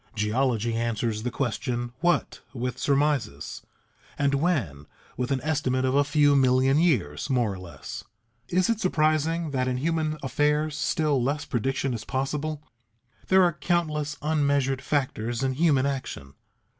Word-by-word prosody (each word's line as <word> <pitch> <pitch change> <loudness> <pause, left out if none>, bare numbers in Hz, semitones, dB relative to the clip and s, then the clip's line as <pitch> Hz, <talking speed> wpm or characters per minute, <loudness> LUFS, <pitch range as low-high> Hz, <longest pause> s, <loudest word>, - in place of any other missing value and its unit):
Geology 115 +1 0
answers 115 -1 -1
the 125 - -2
question 120 0 -2
"What?" 175 +4 +1 0.2
with 125 +1 -3
surmises, 140 - 0 0.6
and 140 -1 +1
"When?" 135 - 0 0.3
with 125 +1 -2
an 135 -2 0
estimate 135 -4 0
of 130 - +1
a 140 +1 +4
few 145 0 +3
million 130 +1 +4
years 105 - +1
more 120 -6 +1
or 95 - -8
less. 85 -7 -8 0.5
Is 180 +1 +2
it 230 -2 0
surprising 160 -2 +1
that 130 -2 0
in 125 0 0
human 155 +1 -1
affairs 150 +2 +1
still 150 -2 +1
less 145 +4 -1
prediction 135 +2 -1
is 115 -2 -4
possible? 145 +4 -3 0.6
There 190 0 +5
are 175 -1 +3
countless 155 -4 -1
unmeasured 140 -3 +1
factors 125 -4 -1
in 130 0 +1
human 140 -2 +3
action. 130 - -4
135 Hz, 145 wpm, -26 LUFS, 120-150 Hz, 0.6 s, There